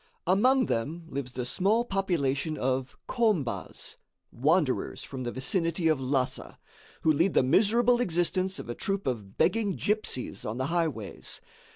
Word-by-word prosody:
Among 250 Hz, +8 st, +4 dB
them 155 Hz, +9 st, -2 dB
lives 130 Hz, -2 st, -4 dB
the 125 Hz, -1 st, -3 dB
small 205 Hz, -, +2 dB
population 160 Hz, -, 0 dB
of 130 Hz, 0 st, -1 dB
Khombas, 215 Hz, -, -1 dB, 0.3 s
wanderers 150 Hz, +2 st, +1 dB
from 135 Hz, -2 st, -7 dB
the 120 Hz, -, -2 dB
vicinity 165 Hz, +5 st, 0 dB
of 155 Hz, -3 st, +2 dB
Lhassa, 130 Hz, 0 st, -1 dB, 0.5 s
who 155 Hz, -, +5 dB
lead 170 Hz, +6 st, +2 dB
the -, -, +5 dB
miserable 230 Hz, -, +4 dB
existence 185 Hz, -1 st, +1 dB
of -, -, -7 dB
a 120 Hz, -, -3 dB
troupe 195 Hz, +8 st, -2 dB
of 105 Hz, -7 st, -4 dB
begging 215 Hz, -4 st, +2 dB
gipsies 210 Hz, -11 st, -1 dB
on 110 Hz, +2 st, -4 dB
the 130 Hz, -, -1 dB
highways. 155 Hz, -, -2 dB
165 Hz, 145 wpm, -28 LUFS, 130-195 Hz, 0.5 s, who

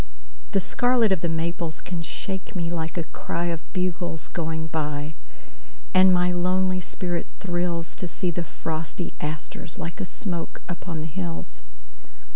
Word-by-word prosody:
The 195 Hz, -, +6 dB
scarlet 240 Hz, +3 st, +4 dB
of 190 Hz, -4 st, +3 dB
the 170 Hz, -, +2 dB
maples 165 Hz, 0 st, 0 dB
can 175 Hz, -2 st, -3 dB
shake 190 Hz, +5 st, -3 dB
me 170 Hz, -2 st, 0 dB
like 165 Hz, 0 st, -1 dB
a 170 Hz, -, +2 dB
cryOf 170 Hz, +1 st, -1 dB
bugles 175 Hz, -3 st, -1 dB
going 160 Hz, -1 st, -1 dB
by. 150 Hz, -1 st, -1 dB, 0.8 s
And 185 Hz, 0 st, +9 dB
my 180 Hz, 0 st, +5 dB
lonely 185 Hz, +1 st, +3 dB
spirit 175 Hz, -1 st, 0 dB
thrillsTo 175 Hz, -1 st, 0 dB
see 180 Hz, 0 st, 0 dB
the 170 Hz, +1 st, -1 dB
frosty 160 Hz, +2 st, -3 dB
asters 155 Hz, +2 st, -4 dB
like 170 Hz, 0 st, -3 dB
a -, -, 0 dB
smoke 175 Hz, -7 st, -3 dB
upon 170 Hz, -2 st, -3 dB
the -, -, -2 dB
hills. 80 Hz, -, -3 dB
170 Hz, 140 wpm, -27 LUFS, 160-180 Hz, 0.8 s, And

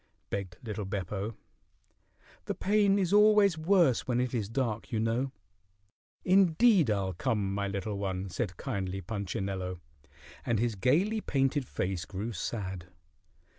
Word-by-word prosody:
begged 95 Hz, -3 st, -4 dB
little 110 Hz, -2 st, -4 dB
Beppo. 100 Hz, +2 st, -4 dB, 1.1 s
"The -, -, -2 dB
pain 200 Hz, 0 st, +3 dB
is 190 Hz, -1 st, +1 dB
always 210 Hz, -3 st, +6 dB
worse 160 Hz, -, +3 dB
when 125 Hz, -1 st, +1 dB
it 125 Hz, 0 st, -1 dB
is 110 Hz, -4 st, -1 dB
dark, 115 Hz, -3 st, -2 dB
you 115 Hz, -, 0 dB
know." 115 Hz, +4 st, 0 dB, 0.9 s
"Indeed, 190 Hz, -, +5 dB
I'll 100 Hz, -3 st, 0 dB
come, 100 Hz, -1 st, -1 dB
my 100 Hz, 0 st, -1 dB
little 100 Hz, +1 st, -3 dB
one," 95 Hz, -1 st, -2 dB
said 90 Hz, -1 st, -3 dB
kindly 95 Hz, 0 st, -3 dB
Punchinello, 95 Hz, -2 st, -4 dB, 0.6 s
and 120 Hz, -, 0 dB
his 115 Hz, +1 st, +1 dB
gayly 170 Hz, -, +2 dB
painted 135 Hz, -, 0 dB
face 90 Hz, -2 st, -2 dB
grew 105 Hz, +4 st, -4 dB
sad. 95 Hz, -3 st, -4 dB
110 Hz, 135 wpm, -30 LUFS, 95-145 Hz, 1.1 s, always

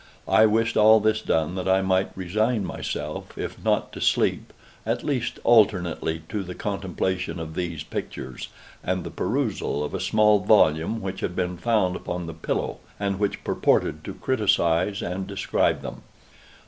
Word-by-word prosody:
I 110 Hz, 0 st, +6 dB
wished 115 Hz, +2 st, +1 dB
all 110 Hz, +1 st, +7 dB
this 110 Hz, 0 st, +1 dB
done 80 Hz, -4 st, 0 dB
that 95 Hz, 0 st, -3 dB
I 95 Hz, 0 st, +3 dB
might 95 Hz, 0 st, +2 dB
resign 105 Hz, +4 st, 0 dB
myself, -, -, -5 dB
if -, -, -6 dB
not -, -, +1 dB
to -, -, -7 dB
sleep, -, -, +1 dB, 0.3 s
at 115 Hz, +2 st, -2 dB
least 130 Hz, -5 st, -1 dB
alternately 90 Hz, -8 st, +3 dB
to 105 Hz, -, -2 dB
the 90 Hz, -1 st, -7 dB
contemplation 95 Hz, -2 st, -2 dB
of 80 Hz, -1 st, -6 dB
these 85 Hz, -3 st, -3 dB
pictures, 65 Hz, -4 st, -6 dB, 0.4 s
and 95 Hz, 0 st, -1 dB
the -, -, -6 dB
perusal 75 Hz, -, -1 dB
of 75 Hz, -, -5 dB
a -, -, -2 dB
small 105 Hz, -1 st, +4 dB
volume 95 Hz, 0 st, +3 dB
which 95 Hz, 0 st, -4 dB
had 90 Hz, -, -3 dB
been 90 Hz, -1 st, -1 dB
found 95 Hz, -2 st, +1 dB
upon 90 Hz, -1 st, -4 dB
the 80 Hz, -, -6 dB
pillow, 80 Hz, -, -3 dB, 0.2 s
and 100 Hz, -1 st, -1 dB
which 100 Hz, -1 st, -1 dB
purported -, -, +1 dB
to -, -, -6 dB
criticise 100 Hz, -5 st, +1 dB
and 90 Hz, +2 st, -3 dB
describe -, -, 0 dB
them. -, -, -7 dB
95 Hz, 160 wpm, -25 LUFS, 90-110 Hz, 0.4 s, all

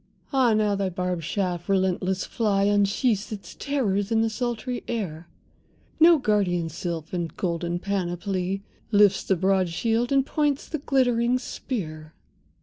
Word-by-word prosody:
—Ah 250 Hz, -5 st, +4 dB
now 210 Hz, -1 st, +2 dB
thy 195 Hz, -1 st, 0 dB
barbed 180 Hz, -1 st, -2 dB
shaft, 180 Hz, 0 st, -2 dB
relentless 190 Hz, -1 st, +1 dB
fly, 205 Hz, -4 st, +1 dB
Unsheaths 205 Hz, +2 st, +1 dB
its 205 Hz, -2 st, -7 dB
terrors 215 Hz, -8 st, -1 dB
in 225 Hz, 0 st, +3 dB
the 225 Hz, -, 0 dB
sultry 240 Hz, +2 st, -3 dB
air! 175 Hz, -8 st, -4 dB, 0.7 s
No 330 Hz, +1 st, +8 dB
guardian 195 Hz, -, +1 dB
sylph, 165 Hz, +2 st, -5 dB
in 175 Hz, -2 st, -1 dB
golden 175 Hz, -1 st, -1 dB
panoply, 190 Hz, 0 st, -2 dB, 0.3 s
Lifts 205 Hz, -2 st, +5 dB
the 190 Hz, -, +1 dB
broad 190 Hz, 0 st, +2 dB
shield, 225 Hz, +8 st, 0 dB
and 270 Hz, -1 st, +3 dB
points 290 Hz, -2 st, 0 dB
the 310 Hz, -, -3 dB
glittering 250 Hz, -3 st, +2 dB
spear. 155 Hz, -, -6 dB
200 Hz, 140 wpm, -25 LUFS, 180-235 Hz, 0.7 s, No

